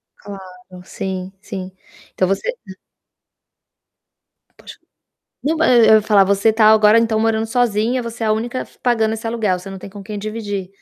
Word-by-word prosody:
Claro, 200 -1 -10 0.4
sim, 190 0 -5
sim. 185 -2 -7 0.4
Então 185 - 0
você 195 - -2 0.2
hã. 190 0 -11 1.8
Poxa. - - -13 0.7
Não, 315 +3 0
ma 320 - +2
e 245 - +5
eu 220 - +7
ia 215 - +4
falar, 205 -2 +4
você 200 +3 +2
tá 220 -1 +3
agora 215 0 +5
então 225 -1 0
morando 225 0 +1
sozinha. 235 +1 0
Você 230 0 -6
é - - 0
a - - +2
única 240 +4 -2
f - - -13
pagando 225 -3 +1
esse 225 +1 -5
aluguel. 215 -6 -1
Você 195 +2 -10
não 195 - -8
tem - - -10
com 200 +1 -11
quem 210 +1 -7
dividir? 205 -3 -5
215 Hz, 185 wpm, -18 LUFS, 195-225 Hz, 1.8 s, eu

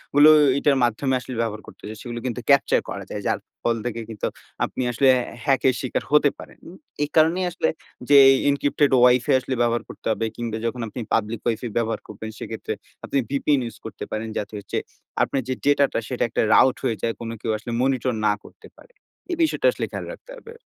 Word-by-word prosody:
গুলো 145 +1 +8 0.3
এইটার 140 -1 +3
মাধ্যমে 120 +3 +1
আসলে 125 - -8
ব্যবহার 110 -2 -3
করতে - - -15
চাই 110 +1 -7
সেগুলো 120 -1 -6
কিন্তু 125 -1 -2
ক্যাপচার 140 -1 +5
করা - - -5
যায়। - - -4
যার - - 0 0.2
ফল 115 - +2
থেকে 115 -1 -3
কিন্তু 110 -3 -3 0.4
আপনি - - -5
আসলে 135 +3 +2 0.4
হ্যাকের 130 -1 +3
শিকার 130 - -2
হতে 150 -1 +5
পারেন। - - -12
উ - - -11 0.3
এই 145 - -2
কারণেই 165 +4 +4
আসলে 175 - 0 0.4
যে 145 - +8 0.3
এনক্রিপ্টেড 145 0 +2
Wi-Fi 125 +3 +4
আসলে 130 0 -3
ব্যবহার 120 0 +1
করতে - - -12
হবে 115 +1 -1
কিংবা 115 -2 -4
যখন 120 +1 -2
আপনি 115 +3 -6
পাবলিক 110 0 0
Wi-Fi 115 +1 -1
ব্যবহার 115 -1 0
করবেন 110 +1 -8
সেক্ষেত্রে 110 - -5 0.3
আপনি - - -1
VPN 140 0 +1
ইউস 115 - -8
করতে 110 -3 -7
পারেন 110 +1 -3
যাতে 105 - -4
হচ্ছে 100 - -5 0.5
আপনার 135 - -1
যে 130 - 0
ডেটাটা 140 -2 +3
সেটা 125 - -1
একটা - - 0
রাউট 130 - +5
হয়ে 120 -4 0
যায়, 115 - 0
কোনো 115 -1 -5
কেউ 110 - -1
আসলে 115 +3 -7
মনিটর 130 -1 +1
না 105 - +4
করতে 440 - -15
পারে। - - -19 0.4
এই 345 - -1
বিষয়টা 325 +9 +1
আসলে - - -3
খেয়াল - - -5
রাখতে - - -14
হবে। 460 -1 -12
125 Hz, 200 wpm, -23 LUFS, 115-140 Hz, 0.5 s, গুলো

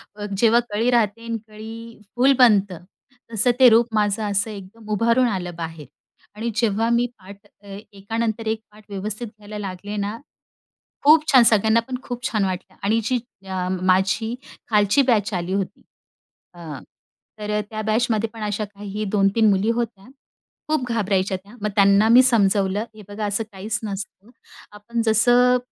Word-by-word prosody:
अ, 205 0 -6
जेव्हा 230 +2 +4
कळी 220 +4 0
राहते 230 -1 +1
आणि 230 0 -2
कळी 225 +1 -10 0.2
फुल 265 +3 +4
बनतं 200 -8 +4 0.5
तसं 225 +3 +3
ते 255 -2 +9
रूप 230 +1 +4
माझं 210 0 +1
असं 200 +3 0
एकदम 210 +2 -11
उभारून 235 +4 +3
आलं 180 -5 -3
बाहेर. 160 -3 -6 0.5
आणि 230 +2 -3
जेव्हा 225 0 +1
मी 235 +1 +2
पाठ 200 +2 -14 0.2
अ, 200 -1 -9 0.2
एकानंतर 225 +2 -3
एक 220 0 -1
पाठ 215 0 -18
व्यवस्थित 210 +4 -4
घ्यायला 210 0 -11
लागले 200 +1 -6
ना 205 +2 -3 0.9
खूप 305 +2 +6
छान! 255 -3 +7
सगळ्यांना 220 0 +4
पण 255 - -4
खूप 245 -1 -6
छान 215 -3 0
वाटलं. 185 -1 -5
आणि 220 +3 +2
जी 245 +3 0 0.3
अ, 185 -1 -3
माझी 195 +5 +1 0.3
खालची 210 +4 +3
बॅच 210 -2 +1
आली 180 +1 -2
होती 195 -1 -3 0.7
अ, 160 -5 -8 0.6
तर 210 0 -2
त्या 215 -1 -4
बॅचमध्ये 220 0 0
पण 225 - -10
अशा 210 0 -2
काही 205 +1 -7
2-3 205 +2 +3
मुली 200 +3 +2
होत्या, 230 -4 -2 0.6
खूप 305 -4 0
घाबरायच्या 195 -4 0
त्या. 200 +5 -17
मग 210 - -1
त्यांना 200 +1 +5
मी 245 +2 +8
समजावलं 205 -4 +2
हे 215 - -12
बघा 210 +1 -5
असं 205 +2 -1
काहीच 210 +3 -4
नसतं. 205 +1 -7 0.4
आपण 230 +3 -4
जसं 245 +3 +4
215 Hz, 160 wpm, -22 LUFS, 200-230 Hz, 0.9 s, ते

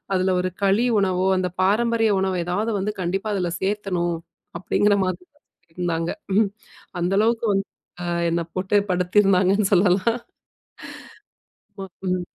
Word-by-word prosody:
அதில 185 0 +1
ஒரு 185 0 -2
களி 200 +5 +3
உணவோ 185 -1 +1
அந்த 180 -1 -1
பாரம்பரிய 225 +2 +2
உணவு 190 -1 0
எதாவது 205 +6 -1
வந்து 205 +2 -2
கண்டிப்பா 195 +4 -2
அதில 180 -3 -1
சேர்த்தணும். 190 -4 -1 0.4
அப்பிடிங்கிற 205 +2 +2
மாரிதான் 270 - -5 0.5
இருந்தாங்க 170 -2 -2 0.3
ம் 215 -3 +3 0.5
அந்த 175 +2 0
அளவுக்கு 230 +2 +1
வந்து 195 0 0 0.4
அ - - -4 0.3
என்ன 170 - 0
போட்டே 190 +2 +2
படுத்திருந்தாங்கன்னு 190 +2 +3
சொல்லலாம் 190 +4 +3 1.6
ஆமா. - - -4 0.2
ம். 180 -1 -1
190 Hz, 125 wpm, -23 LUFS, 180-210 Hz, 1.6 s, களி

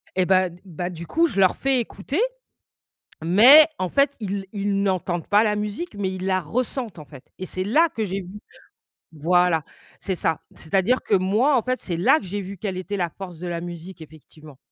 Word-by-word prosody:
Et 185 -1 +2
bah, 185 0 +3
d 175 +1 -16
bah 175 -1 -5
du 170 -1 -8
coup, 335 +1 +2
je 235 - -3
leur 185 -2 +4
fais 270 -1 +1
écouter. 235 - -4 1.0
Mais, 240 - +8
en 185 - -1
fait, 280 +7 +2
ils 200 -2 -4
ils 200 -1 -1
n'entendent 185 -3 -1
pas 210 +2 +4
la 210 -1 +1
musique, 210 +9 -4
mais 195 -2 -2
ils 185 0 -5
la 185 -1 +1
ressentent 235 - -3
,en 155 - -9
fait 140 -4 -14
et 185 - -5
c'est 185 +1 -4
là 300 - +3
que 225 -8 -3
j'ai 195 0 -3
vu 180 - -12 0.9
voilà, 170 +1 +2 0.4
c'est 190 - -3
ça. 165 -2 -1 0.2
C'est 160 - -15
à 195 - +5
dire 250 +7 +2
que - - -2
moi, 215 +10 +2
en - - +2
fait, 255 0 -2
c'est 175 -3 -4
là 180 - +4
que - - -11
j'ai 200 +3 -4
vu 195 0 -7
quelle 190 0 -4
était 185 +2 -4
la 175 -3 -1
force 180 -1 -10
de 180 - -6
la 170 -1 -3
musique, 175 +1 -9
effectivement. 155 -2 -15
190 Hz, 220 wpm, -23 LUFS, 175-210 Hz, 1.0 s, Mais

